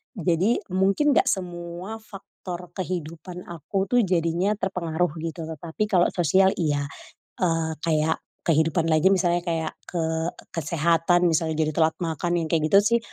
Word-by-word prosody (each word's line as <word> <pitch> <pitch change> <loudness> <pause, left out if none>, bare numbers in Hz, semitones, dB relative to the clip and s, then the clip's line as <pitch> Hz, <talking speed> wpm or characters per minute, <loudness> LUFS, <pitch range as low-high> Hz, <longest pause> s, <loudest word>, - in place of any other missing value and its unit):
jadi 185 +4 +1
mungkin 195 +11 +3
gak - - +4
semua 175 +2 -5
faktor 180 -4 -9
kehidupan 175 -1 -5
aku 175 +4 -3
tuh 245 - +4
jadinya 175 +1 +1
terpengaruh 180 -3 -1
gitu 165 0 -4
tetapi 165 +5 -3
kalau 180 -4 +4
sosial 190 +3 +4
iya, 145 -4 0 0.6
eee, 165 -2 +1
kayak 160 -1 +1 0.3
kehidupan 165 +1 +2
lagi 160 +3 +4
misalnya 175 -2 +2
kayak 165 -2 -2
ke 170 -2 -2 0.5
kesehatan 170 +2 +2
misalnya 160 0 +1
jadi 155 -1 +1
telat 160 -1 +3
makan 170 +1 -1
yang 165 - -2
kayak 165 -2 +2
gitu 200 - +9 0.2
sih - - +2
170 Hz, 140 wpm, -25 LUFS, 160-185 Hz, 0.6 s, gitu